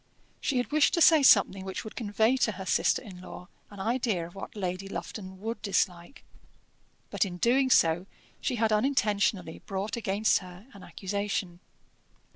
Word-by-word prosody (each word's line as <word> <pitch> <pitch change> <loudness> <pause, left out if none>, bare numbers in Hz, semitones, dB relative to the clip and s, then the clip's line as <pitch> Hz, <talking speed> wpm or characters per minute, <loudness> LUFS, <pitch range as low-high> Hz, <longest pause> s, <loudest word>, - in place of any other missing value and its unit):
She 275 - -1
had 245 - -1
wished 305 -1 +3
to - - 0
say 320 -2 +7
something 200 -6 +5
which 190 0 -5
would 215 - -9
convey 220 +2 +1
to 220 -4 +1
her 190 0 -7
sister - - +1
in 185 -6 -11
law 185 0 -10 0.2
an 205 - -12
idea 220 -4 -1
of 170 - -12
what 195 - -9
Lady 185 -1 -4
Lufton 190 +1 -7
would 225 +3 -5
dislike; 185 +1 -2 0.9
but - - +1
in 180 -3 -5
doing 260 +6 +2
so, 170 -4 +3 0.3
she 255 - -2
had 225 -1 +1
unintentionally 205 -7 0
brought 200 +1 -3
against 215 -1 +1
her 180 +1 -12
an 200 - -13
accusation. 195 -2 -4
200 Hz, 165 wpm, -28 LUFS, 185-225 Hz, 0.9 s, say